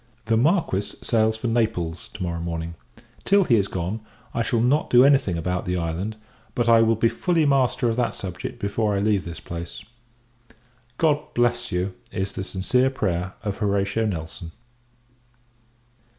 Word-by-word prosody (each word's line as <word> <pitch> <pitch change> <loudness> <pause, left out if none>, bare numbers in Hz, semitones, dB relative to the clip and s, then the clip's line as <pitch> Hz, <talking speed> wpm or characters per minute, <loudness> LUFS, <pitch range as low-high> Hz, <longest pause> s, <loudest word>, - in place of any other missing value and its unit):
The 115 0 +2
Marquis 140 - +2 0.2
sails 110 -1 +2
for 110 - -7
Naples 110 -8 -1
to 105 - -4
morrow 85 -1 -2
morning. 85 0 -4 0.5
Till 200 0 +4
he 120 - +3
is 100 -2 +1
gone, 95 +5 -3 0.3
I 115 - 0
shall 115 0 +1
not 130 +6 +2
do 125 +1 +7
any 140 -1 +6
thing 95 -10 -3
about 90 +2 -2
the 90 0 0
island; 85 +6 -3 0.4
but 120 -1 +1
I 115 -1 +7
will 115 0 +4
be 115 +2 +3
fully 165 +5 +1
master 135 -2 +2
of 115 0 0
that 125 - 0
subject 90 -2 -6
before 105 +1 0
I - - +1
leave 100 -1 +1
this 85 -1 -7
place. 85 +3 -7 1.1
God 150 -2 +1
bless 120 0 +1
you! 90 +2 -1 0.2
is 95 +1 -3
the 95 - -4
sincere 125 +8 +1
prayer 90 -8 -2
of 100 -2 -3
HORATIO 100 +1 +1
NELSON. 80 -2 -5
105 Hz, 165 wpm, -24 LUFS, 90-120 Hz, 1.1 s, do